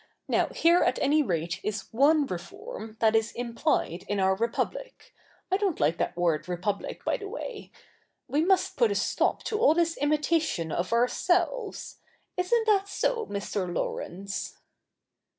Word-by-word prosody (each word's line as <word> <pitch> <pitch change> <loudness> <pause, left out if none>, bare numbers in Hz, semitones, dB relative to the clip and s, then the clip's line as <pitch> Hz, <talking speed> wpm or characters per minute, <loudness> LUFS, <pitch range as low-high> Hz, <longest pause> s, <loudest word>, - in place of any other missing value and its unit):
Now, - - +2
here 340 +2 +3
at 250 - +2
any 300 +2 +3
rate 170 - -1
is 210 0 -4
one 290 +5 +4
reform 220 - -7
that 220 -1 +4
is 225 0 +2
implied 235 - -1
in 205 - -1
our 190 0 +3
Republic; 235 - -3 0.2
— - - -36
I 380 - +4
don't 395 -5 -1
like 155 +3 +2
that 175 - -1
word 165 -2 0
Republic, 185 +3 -3
by - - +1
the 405 - -7
way - - -7 0.3
— - - -44
we 285 +4 +1
must 375 +1 +2
put 470 - +4
a - - 0
stop - - 0
to 425 - -2
all 450 -9 +5
this 335 -1 +1
imitation 300 - +1
of 175 +1 -2
ourselves. 355 - 0 0.4
Isn't 445 +6 +1
that 400 -3 +3
so, 460 +3 -1
Mr. 200 -2 -3
Laurence 195 +3 -4
275 Hz, 160 wpm, -28 LUFS, -, 0.4 s, all